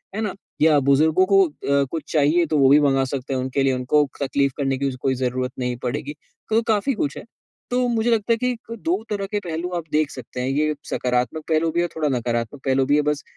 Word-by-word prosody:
है 220 - -2
ना? 210 -3 -2 0.3
या 155 -2 +5
बुजुर्गों 160 +6 +4
को 195 0 +5
अ, 140 -1 0
कुछ 165 - -5
चाहिए 155 +3 +3
तो 155 - 0
वो 135 -1 +5
भी 145 - +7
मँगा 135 -2 +3
सकते 135 0 -4
हैं 130 - 0
उनके 130 +1 -1
लिए। 135 -1 +2
उनको 140 +3 +2
तकलीफ 140 0 +1
करने 135 -2 0
की 140 -1 0
ज़ 130 +1 -1
ज़रूरत 125 +1 -1
नहीं 125 -1 -2
पड़ेगी। 140 +4 -3 0.4
तो 225 +1 +3
काफ़ी 225 +4 +1
कुछ 145 -9 -2
है। - - -7 0.5
तो 250 0 +2
मुझे 230 0 +1
लगता 230 +1 +2
है - - 0
कि 250 +2 0
क - - -17
तो 230 - -6
2 325 +3 -2
तरह 200 -2 -2
के 210 - 0
पहलू 175 -2 -4
आप 170 - -4
देख 155 -1 +2
सकते 125 -1 -7
हैं। 125 - -2
ये 150 +2 +1
सकारात्मक 125 +4 -1
पहलू 160 +1 +2
भी 170 - -1
है - - +1
और - - -22
थोड़ा 155 -2 0
नकारात्मक 120 +2 -3
पहलू 135 0 +2
भी 145 +2 +3
है। 150 - +4
बस 140 -1 -5
145 Hz, 245 wpm, -22 LUFS, 135-185 Hz, 0.5 s, भी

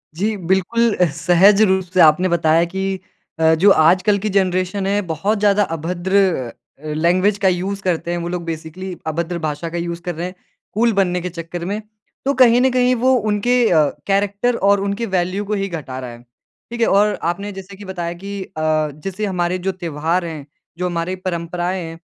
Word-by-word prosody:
जी, 210 +5 -1
बिल्कुल 190 +6 +1
अ, 180 - +3
सहज 180 +5 +5
रूप 190 0 +2
से 185 - +1
आपने 160 +4 +5
बताया 165 -1 +3
कि 190 0 -2 0.4
अ, 160 0 +4
जो 190 +6 +5
आजकल 185 +5 +4
की - - +1
जनरेशन 190 0 0
है, 205 +1 +1
बहुत 190 +4 -1
ज़्यादा 205 0 +3
अभद्र 175 +4 -1 0.6
अ, 155 - -10
लैंग्वेज 185 +6 +2
का - - +7
यूज़ 190 +2 -2
करते 175 -2 -1
हैं, 175 - -1
वो 170 0 -4
लोग 175 -1 -3
बेसिकली 165 +3 -6
अभद्र 170 +2 -2
भाषा 150 +3 -4
का 170 - -5
यूज़ 170 0 -4
कर 175 -2 -4
रहे 170 - -4
हैं 185 - -10 0.4
कूल 230 +1 +2
बनने 180 -2 +1
के 180 - -4
चक्कर 170 0 -6
में। 205 +3 -3 0.4
तो 275 - +2
कहीं 240 -1 +6
न 260 - +4
कहीं 250 0 +3
वो 255 +2 +3 0.2
उनके 225 +4 +1
अ, 160 -3 +5 0.2
कैरेक्टर 200 +4 +1
और 200 0 +4
उनकी 200 +3 -2
वैल्यू 185 +3 -1
को 210 - -3
ही - - -1
घटा 140 -7 -6
रहा 125 -2 -6
है। 120 0 -12 0.5
ठीक 235 0 -4
है? - - +4
और 205 +1 +3 0.2
आपने 200 +4 -6
जैसे 195 0 -10
की 205 - -10
बताया 175 -3 -4
कि 200 0 -5
अ, - - -16 0.5
जैसे 195 +2 -3
हमारे 180 -2 -1
जो - - +3
त्योहार 170 0 -2
हैं, 155 -4 -6 0.3
जो 180 - -2
हमारी 175 +1 -2
परंपराएँ 175 +1 -2
हैं, 165 0 -8
185 Hz, 200 wpm, -19 LUFS, 170-200 Hz, 0.6 s, का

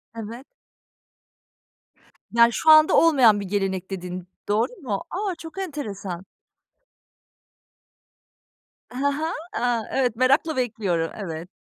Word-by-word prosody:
Evet. 230 +4 -7 1.9
Yani, 235 0 +5
şu 320 - +1
anda 310 0 +7
olmayan 260 -10 +5
bir 200 - -5
gelenek 190 -1 -2
dedin, 180 -1 -6 0.2
doğru 210 - +1
mu? 210 -8 -3
A! 385 0 -3
Çok 325 +2 -11
enteresan. 205 - -5 2.7
He 250 - -8
he. 285 +4 0 0.2
A, 240 -1 0
evet, 250 -4 +1
merakla 275 +6 +2
bekliyorum. 200 -9 -1
Evet. 170 -4 -6
230 Hz, 105 wpm, -24 LUFS, 195-285 Hz, 2.7 s, anda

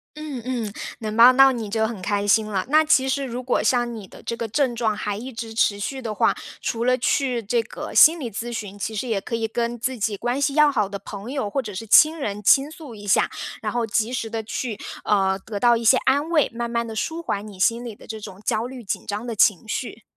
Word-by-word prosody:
嗯 300 -5 -6
嗯， 235 -5 -3 0.3
能 215 0 -4
帮 250 +2 +8
到 270 0 +7
你 230 -4 -4
就 220 0 +1
很 220 -4 -6
开 205 +1 -1
心 215 +1 +4
了。 200 -3 -2
那 310 +1 +5
其 265 -3 +3
实 275 +1 0
如 250 0 -5
果 250 -4 0
像 240 0 +1
你 200 -4 -9
的 - - -14
这 230 - -4
个 230 - -3
症 255 +1 0
状 220 -3 0
还 205 -1 -3
一 255 +4 -7
直 225 0 -6
持 205 -2 +2
续 265 +5 -4
的 220 -2 -3
话， - - +2 0.3
除 230 +1 -2
了 255 0 +4
去 250 -1 +1
这 230 +3 0
个 295 +7 -8
心 325 +2 +7
理 245 -5 -4
咨 235 +3 -5
询， 205 -3 -6
其 215 +2 -4
实 245 +4 -3
也 215 -4 0
可 230 - -4
以 225 -1 -1
跟 235 +1 -2
自 255 +1 -2
己 210 0 -1
关 245 +6 -2
系 280 0 +1
要 300 0 +5
好 210 -7 +1
的 200 0 -6
朋 200 +4 -8
友， 265 -8 -2
或 270 +5 -2
者 210 -3 -7
是 225 +4 -6
亲 310 +8 +6
人 210 -5 -4
倾 275 +8 +5
诉 310 -6 -11
一 205 -1 -10
下。 190 - +3 0.3
然 - - -3
后 235 -2 -1
及 225 +3 0
时 230 -3 -3
地 225 0 -4
去 225 0 -4 0.3
呃， 195 -2 +2
得 205 +1 -6
到 240 -1 +5
一 230 - -3
些 255 +3 +6
安 285 +4 +2
慰， 315 -4 +3
慢 235 0 -3
慢 235 0 -1
地 225 -1 -7
舒 325 +9 -3
缓 205 -5 -3
你 195 -3 -12
心 235 +2 +2
里 230 -4 -7
的 - - -16
这 220 -1 -7
种 190 -2 -10
焦 225 +3 0
虑 255 -2 -9
紧 195 - -4
张 210 +3 -4
的 235 -2 -4
情 205 0 +3
绪。 225 -1 -5
230 Hz, 280 characters per minute, -23 LUFS, 210-255 Hz, 0.3 s, 帮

